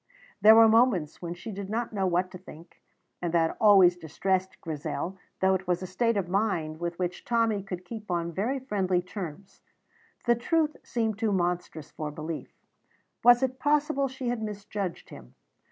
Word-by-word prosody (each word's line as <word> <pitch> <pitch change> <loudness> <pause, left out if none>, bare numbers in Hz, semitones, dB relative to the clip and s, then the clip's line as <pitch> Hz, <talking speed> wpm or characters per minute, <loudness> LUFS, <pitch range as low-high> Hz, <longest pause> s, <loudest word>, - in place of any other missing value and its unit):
There 220 +1 +9
were 225 0 +8
moments 220 - +3
when 170 -1 -5
she 220 +6 -8
did 195 -1 -6
not 230 +1 -2
know 195 -2 0
what 180 +1 0
to 185 - -9
think, 170 -2 -14 0.4
and 175 -1 -1
that 165 -1 +2
always 195 -5 +7
distressed 185 +3 -2
Grizel, 165 +4 -4 0.2
though 190 0 +4
it 190 0 -2
was 180 +1 0
a - - -3
state 210 +5 0
of 190 -3 -1
mind 175 -5 -1
with 170 0 -3
which 180 -1 -3
Tommy 225 -3 +1
could 185 -2 -7
keep 215 0 -8
on 170 -1 -1
very 220 - -1
friendly 190 -8 0
terms. 185 -1 -8 0.6
The 240 - +5
truth 305 +6 0
seemed 225 -4 -2
too 225 -2 +1
monstrous 175 -4 -2
for 155 -1 -5
belief. 155 +2 -6 0.7
Was 245 +1 +7
it 260 0 -1
possible 290 -1 +1
she 260 -1 -4
had 240 -2 -2
misjudged 205 -3 -5
him? 60 +2 -13
190 Hz, 175 wpm, -28 LUFS, 175-225 Hz, 0.7 s, There